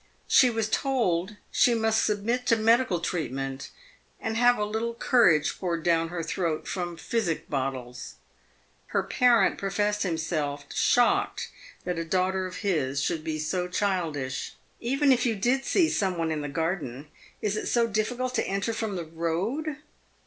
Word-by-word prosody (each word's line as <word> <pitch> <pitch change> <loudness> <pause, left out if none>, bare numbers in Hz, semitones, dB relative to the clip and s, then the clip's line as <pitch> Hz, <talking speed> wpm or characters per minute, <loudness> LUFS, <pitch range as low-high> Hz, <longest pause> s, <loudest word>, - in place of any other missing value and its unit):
She 255 - +6
was 225 -2 -1
told 215 -7 0 0.2
she 240 - +4
must 220 -1 +2
submit 230 +4 -1
to 230 - +5
medical 225 -4 +3
treatment, 135 -5 -3 0.5
and 220 0 -3
have 245 +1 +4
a 210 - 0
little 225 +2 -2
courage 180 - +3
poured 170 -3 -2
down 165 -1 +2
her 170 -1 -4
throat 165 -1 -2
from 175 -2 -3
physic 180 -3 -2
bottles. 130 -2 -4 0.7
Her - - 0
parent 245 -3 +3
professed 205 +1 0
himself 160 -5 -2
shocked 245 -1 +2 0.3
that 180 -2 -2
a - - -1
daughter 185 +2 0
of 185 - -9
his 140 -8 0
should 155 +3 -1
be 155 -1 -2
so 180 +4 -2
childish. 165 -9 -2
" - - -38
Even 275 +4 +2
if 250 -1 +3
you 225 - +1
did 250 +7 +1
see 345 -4 +3
some 190 - 0
one 165 -1 -1
in 155 -1 -2
the 145 - -4
garden, 155 -3 -3 0.3
is 210 -1 -1
it - - -3
so 235 -1 +3
difficult 240 +4 -1
to - - 0
enter 195 +4 -1
from 220 -3 -3
the 175 -2 -4
road 180 - -2
190 Hz, 165 wpm, -27 LUFS, 160-230 Hz, 0.7 s, She